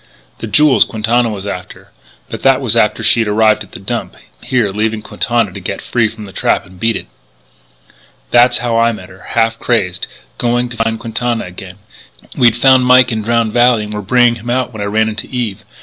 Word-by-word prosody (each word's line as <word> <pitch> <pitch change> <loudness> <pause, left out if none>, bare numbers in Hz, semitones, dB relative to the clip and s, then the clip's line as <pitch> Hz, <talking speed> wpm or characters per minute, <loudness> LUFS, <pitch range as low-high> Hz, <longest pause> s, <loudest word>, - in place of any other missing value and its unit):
"The 115 - -5
jewels 150 +5 +4
Quintana 115 +2 0
was 100 -2 -6
after. 90 -2 -8 0.4
But - - -7
that - - +4
was - - -1
after - - +1
she'd 115 -2 +3
arrived 110 +1 +2
at - - -18
the - - -8
Dump, - - -4 0.3
here, 120 -6 0
leaving 110 +1 -2
Quintana 115 -4 -1
to - - -7
get - - -5
free 120 -2 0
of 110 +1 -10
the 105 -3 -9
trap - - 0
and 90 0 -17
beat 115 +3 +1
it. - - -5 1.3
"That's 120 +1 +5
how 115 -1 +1
I 115 0 +3
met 90 -4 -10
her 95 0 -15
half 115 -1 -1
crazed, 95 -7 -1 0.3
going 120 +1 0
to 120 - -8
find 115 0 -1
Quintana 120 0 -2
again. 90 +1 -10 0.6
We'd 120 -2 +3
found 130 0 +4
Mike 125 0 +5
in 110 -1 -2
Drowned 115 0 0
Valley 120 -2 +3
and 105 0 -7
were 105 - -4
bringing 120 +3 +3
him 120 +3 -8
out 125 0 -1
when 110 - -7
I - - -2
ran 110 +2 +1
into 110 -1 -5
Eve.... 120 -6 -4
115 Hz, 205 wpm, -15 LUFS, 105-120 Hz, 1.3 s, That's